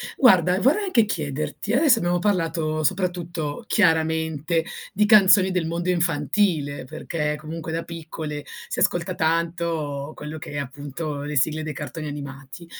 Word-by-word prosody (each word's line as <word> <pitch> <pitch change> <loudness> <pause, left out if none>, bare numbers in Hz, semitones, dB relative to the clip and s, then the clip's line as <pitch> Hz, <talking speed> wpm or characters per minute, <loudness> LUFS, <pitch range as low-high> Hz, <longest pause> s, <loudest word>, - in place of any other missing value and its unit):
guarda 185 - +5
vorrei 310 - +3
anche 240 - +4
chiederti, 155 +3 -3
adesso 265 -3 +5
abbiamo 175 -1 +1
parlato 165 -5 0
soprattutto 175 +1 -2
chiaramente 160 -3 +2 0.3
di 210 +2 +3
canzoni 195 -3 +6
del 180 -3 0
mondo 170 +2 -2
infantile 160 -4 0
perché 150 +2 -3
comunque 160 +1 -6
da 165 - -2
piccole 160 -3 -6 0.2
si - - -3
ascolta 175 +1 +1
tanto 160 -3 -1
quello 150 +1 -7
che 150 - -8
è 145 - -5
appunto 145 +2 -5
le 150 0 -4
sigle 155 +3 +2
dei 155 -1 -4
cartoni 150 +2 -6
animati. 140 +2 -8
160 Hz, 140 wpm, -24 LUFS, 150-180 Hz, 0.3 s, canzoni